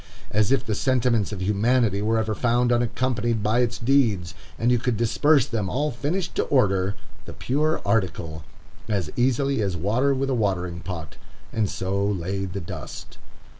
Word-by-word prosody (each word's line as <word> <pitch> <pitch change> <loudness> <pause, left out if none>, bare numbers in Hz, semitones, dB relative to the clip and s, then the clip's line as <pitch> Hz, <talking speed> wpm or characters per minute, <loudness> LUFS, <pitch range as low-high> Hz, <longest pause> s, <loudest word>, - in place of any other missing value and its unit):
As 105 +2 +2
if 135 - +2
the 110 - -1
sentiments 120 -3 +1
of 95 -3 -4
humanity 105 +1 +2
were 110 +2 +1
ever 110 -1 0
found 120 +2 +1
unaccompanied 120 -2 0
by 110 +3 +2
its 120 -1 +1
deeds, 115 - +2 0.2
and 120 +2 +2
you 120 - +3
could 120 -1 -1
disperse 135 +4 +3
them, 110 -8 -2
all 145 +6 0
finished 165 +8 -2
to - - +3
order, 100 -7 +2 0.3
the - - -8
pure 155 +5 0
article, 85 -7 -1 0.5
as 95 -8 -1
easily 130 +1 +1
as 95 -4 -1
water 120 - +1
with 135 +1 -1
a - - +2
watering 90 -6 -1
pot, 85 -3 -7 0.4
and 110 -3 +1
so 100 +1 -2
lay 95 -1 -1
the 95 +1 -5
dust. 85 - -8
115 Hz, 170 wpm, -24 LUFS, 100-125 Hz, 0.5 s, you